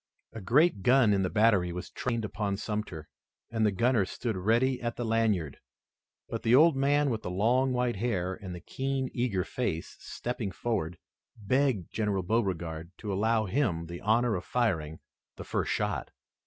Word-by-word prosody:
A 110 Hz, -, -7 dB
great 135 Hz, -, +3 dB
gun 125 Hz, -1 st, +5 dB
in 100 Hz, -, +2 dB
the 90 Hz, -, 0 dB
battery 105 Hz, -5 st, +3 dB
was 90 Hz, +1 st, -6 dB
trained 115 Hz, -3 st, -2 dB
upon 100 Hz, 0 st, -2 dB
Sumter, 105 Hz, -8 st, -4 dB, 0.4 s
and 115 Hz, -1 st, 0 dB
the 105 Hz, -, +4 dB
gunner 115 Hz, +2 st, +2 dB
stood 115 Hz, +3 st, -3 dB
ready 115 Hz, +7 st, +1 dB
at 120 Hz, -1 st, -2 dB
the 120 Hz, -, -3 dB
lanyard, 110 Hz, -10 st, 0 dB, 0.7 s
but -, -, -4 dB
the 115 Hz, +2 st, +4 dB
old 160 Hz, +2 st, +6 dB
man 140 Hz, +1 st, +2 dB
with 110 Hz, -2 st, -2 dB
the -, -, -5 dB
long 120 Hz, +8 st, +2 dB
white 125 Hz, -3 st, 0 dB
hair 95 Hz, -5 st, -1 dB
and 95 Hz, -1 st, -7 dB
the 90 Hz, -, -9 dB
keen, 135 Hz, -1 st, -2 dB
eager 120 Hz, -7 st, 0 dB
face, 90 Hz, -6 st, -3 dB
stepping 120 Hz, -4 st, -4 dB
forward, 90 Hz, -5 st, -2 dB, 0.4 s
begged 120 Hz, -2 st, 0 dB
General 105 Hz, -4 st, 0 dB
Beauregard 85 Hz, -6 st, -1 dB
to 105 Hz, -3 st, -4 dB
allow 110 Hz, +2 st, +2 dB
him 95 Hz, -, 0 dB
the 85 Hz, +1 st, -8 dB
honor 115 Hz, +2 st, +2 dB
of 90 Hz, -, -4 dB
firing 85 Hz, -12 st, -1 dB, 0.4 s
the -, -, -8 dB
first -, -, -2 dB
shot. -, -, -1 dB
110 Hz, 170 wpm, -29 LUFS, 95-125 Hz, 0.7 s, old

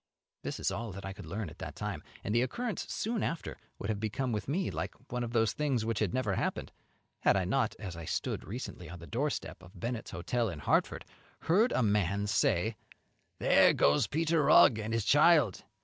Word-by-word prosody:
This -, -, -5 dB
is -, -, 0 dB
all 115 Hz, -2 st, -4 dB
that 100 Hz, +1 st, -8 dB
I 95 Hz, -, -5 dB
could -, -, -10 dB
learn 105 Hz, -1 st, -4 dB
at -, -, -15 dB
that -, -, -6 dB
time; -, -, -4 dB, 0.2 s
and 105 Hz, -, -2 dB
the 120 Hz, -, +4 dB
occurrence 225 Hz, -, -3 dB
soon 225 Hz, 0 st, -1 dB
after 165 Hz, -, -3 dB, 0.2 s
would 100 Hz, -, -2 dB
have 105 Hz, -, -3 dB
become 120 Hz, +4 st, -2 dB
with 105 Hz, -2 st, -3 dB
me 175 Hz, +7 st, -1 dB
like -, -, -4 dB, 0.2 s
one 125 Hz, 0 st, -1 dB
of 115 Hz, -, -4 dB
those 115 Hz, -2 st, +2 dB
things 135 Hz, -7 st, 0 dB
which 115 Hz, -1 st, -1 dB
had 105 Hz, -5 st, +1 dB
never 130 Hz, -6 st, 0 dB
happened, -, -, -2 dB, 0.5 s
had -, -, +3 dB
I 95 Hz, -, 0 dB
not, 130 Hz, +9 st, 0 dB
as 95 Hz, -5 st, -6 dB
I 85 Hz, -1 st, -7 dB
stood -, -, -2 dB
recently 95 Hz, -, -7 dB
on 90 Hz, -, -8 dB
the 85 Hz, -, -11 dB
doorstep 130 Hz, -, -3 dB
of 90 Hz, +1 st, -14 dB
Bennett's 120 Hz, +3 st, -4 dB
Hotel 110 Hz, +6 st, -1 dB
in 85 Hz, -, -6 dB
Hartford, 70 Hz, -, 0 dB, 0.4 s
heard 210 Hz, +9 st, +3 dB
a 130 Hz, -, +2 dB
man 100 Hz, -1 st, +1 dB
say, 105 Hz, -, +1 dB, 0.6 s
"There -, -, +5 dB
goes 70 Hz, +1 st, +3 dB
Peter 160 Hz, +1 st, +1 dB
Rugg 140 Hz, -5 st, +6 dB
and 110 Hz, +1 st, -4 dB
his 115 Hz, -2 st, 0 dB
child! 150 Hz, -, +4 dB
115 Hz, 210 wpm, -31 LUFS, 100-135 Hz, 0.6 s, Rugg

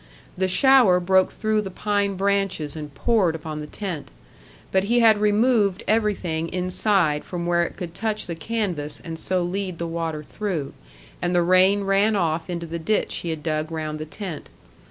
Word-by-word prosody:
The 190 Hz, 0 st, 0 dB
shower 240 Hz, -3 st, +5 dB
broke 190 Hz, +1 st, +3 dB
through 215 Hz, -1 st, 0 dB
the 195 Hz, -, -5 dB
pine 200 Hz, 0 st, -1 dB
branches 195 Hz, -6 st, 0 dB
and 150 Hz, -2 st, -7 dB
poured 200 Hz, -, +2 dB
upon 155 Hz, -1 st, -6 dB
the 150 Hz, -, -6 dB
tent. 180 Hz, -4 st, -5 dB, 0.6 s
But 190 Hz, 0 st, +2 dB
he 240 Hz, +3 st, +3 dB
had 220 Hz, -2 st, +5 dB
removed 210 Hz, -2 st, +2 dB
everything 190 Hz, -7 st, 0 dB
inside 180 Hz, -3 st, +1 dB
from 175 Hz, -1 st, -5 dB
where 175 Hz, 0 st, +2 dB
it 170 Hz, -, -3 dB
could 175 Hz, -3 st, -6 dB
touch 215 Hz, +2 st, -2 dB
the 170 Hz, -, -4 dB
canvas 165 Hz, -6 st, -3 dB
and 165 Hz, -2 st, -6 dB
so 185 Hz, -1 st, +1 dB
lead 185 Hz, 0 st, -3 dB
the 170 Hz, -, -3 dB
water 165 Hz, -2 st, -3 dB
through, 170 Hz, -5 st, -4 dB, 0.5 s
and 175 Hz, 0 st, 0 dB
the 175 Hz, -, +4 dB
rain 185 Hz, +3 st, +4 dB
ran 200 Hz, +2 st, +2 dB
off 165 Hz, -2 st, -1 dB
into 170 Hz, -1 st, -3 dB
the 170 Hz, +1 st, -5 dB
ditch 215 Hz, +7 st, 0 dB
he 170 Hz, -, -4 dB
had 160 Hz, -2 st, -4 dB
dug 155 Hz, 0 st, -2 dB
round 155 Hz, -1 st, -4 dB
the 155 Hz, -, -4 dB
tent. 175 Hz, -1 st, -7 dB
180 Hz, 180 wpm, -23 LUFS, 165-205 Hz, 0.6 s, shower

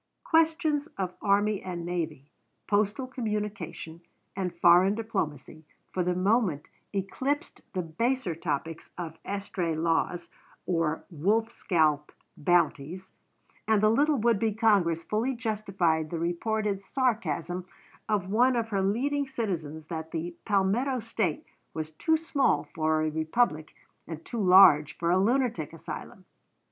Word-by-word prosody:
Questions 315 Hz, -2 st, +2 dB
of 185 Hz, -2 st, -2 dB
army 205 Hz, 0 st, +2 dB
and 175 Hz, -2 st, -5 dB
navy, 165 Hz, -5 st, -3 dB, 0.4 s
postal 210 Hz, +4 st, +1 dB
communication, 210 Hz, -9 st, -4 dB, 0.3 s
and 190 Hz, -2 st, -2 dB
foreign 175 Hz, +3 st, +5 dB
diplomacy, 155 Hz, -, -4 dB, 0.3 s
for 185 Hz, -, 0 dB
the 180 Hz, 0 st, 0 dB
moment 185 Hz, -, +1 dB, 0.3 s
eclipsed 265 Hz, -, -2 dB
the 185 Hz, -2 st, -1 dB
baser 230 Hz, +5 st, -1 dB
topics 160 Hz, 0 st, -4 dB
of 165 Hz, -2 st, -6 dB
estray 195 Hz, -4 st, -3 dB
laws 170 Hz, +2 st, 0 dB, 0.4 s
or 165 Hz, -3 st, -1 dB
wolf 210 Hz, +8 st, +1 dB
scalp 155 Hz, -9 st, +1 dB, 0.2 s
bounties, 175 Hz, +2 st, 0 dB, 0.6 s
and 220 Hz, -1 st, +4 dB
the 215 Hz, -, +5 dB
little 290 Hz, +5 st, +3 dB
would 230 Hz, -2 st, +2 dB
be 220 Hz, -1 st, 0 dB
Congress 195 Hz, -7 st, +3 dB
fully 230 Hz, +8 st, -1 dB
justified 195 Hz, -9 st, 0 dB
the 170 Hz, -, -3 dB
reported 195 Hz, +4 st, -1 dB
sarcasm 185 Hz, -, -1 dB, 0.4 s
of 205 Hz, -4 st, 0 dB
one 250 Hz, +4 st, +4 dB
of 230 Hz, -1 st, -1 dB
her 200 Hz, -3 st, 0 dB
leading 275 Hz, +9 st, 0 dB
citizens 170 Hz, -, -4 dB
that 160 Hz, -1 st, -5 dB
"the 170 Hz, +1 st, -4 dB
Palmetto 220 Hz, +6 st, +1 dB
State 220 Hz, -8 st, -2 dB, 0.3 s
was 155 Hz, -1 st, -4 dB
too 320 Hz, -, +1 dB
small 280 Hz, -, +1 dB
for 155 Hz, 0 st, +1 dB
a 155 Hz, -, 0 dB
republic 160 Hz, 0 st, 0 dB, 0.3 s
and 160 Hz, -1 st, -7 dB
too 235 Hz, -, -3 dB
large 180 Hz, -6 st, +7 dB
for 170 Hz, 0 st, 0 dB
a 185 Hz, -, +4 dB
lunatic 240 Hz, +3 st, +1 dB
asylum." -, -, -8 dB
190 Hz, 130 wpm, -28 LUFS, 165-225 Hz, 0.6 s, large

